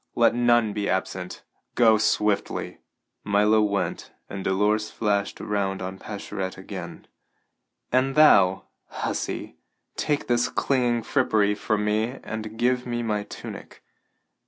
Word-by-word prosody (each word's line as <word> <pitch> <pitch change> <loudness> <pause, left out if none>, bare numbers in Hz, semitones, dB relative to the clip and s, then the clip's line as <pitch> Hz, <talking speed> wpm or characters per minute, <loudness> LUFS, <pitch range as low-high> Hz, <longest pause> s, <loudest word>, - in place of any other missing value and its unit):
Let 120 -1 +4
none 120 -3 +3
be 100 -1 -2
absent. 95 -1 -3 0.3
Go 110 -3 +5
swiftly!" 105 -1 0 0.4
Milo 105 +2 +3
went, 100 -1 -1 0.2
and 100 -1 -5
Dolores 105 +3 +1
flashed 100 -3 -1
around 100 -2 -1
on 95 +1 -6
Pascherette 100 -2 -5
again: 95 -3 -8 0.9
"And 130 +2 +2
thou, 95 -11 +6 0.2
hussy, - - -4 0.4
take 145 -1 0
this 120 0 +1
clinging 120 -4 +1
frippery 110 -6 +2
from 105 0 -1
me 110 +5 0
and 110 0 -6
give 125 +1 +1
me 120 0 -2
my 105 -2 -1
tunic. 105 - -10
105 Hz, 120 wpm, -25 LUFS, 100-120 Hz, 0.9 s, thou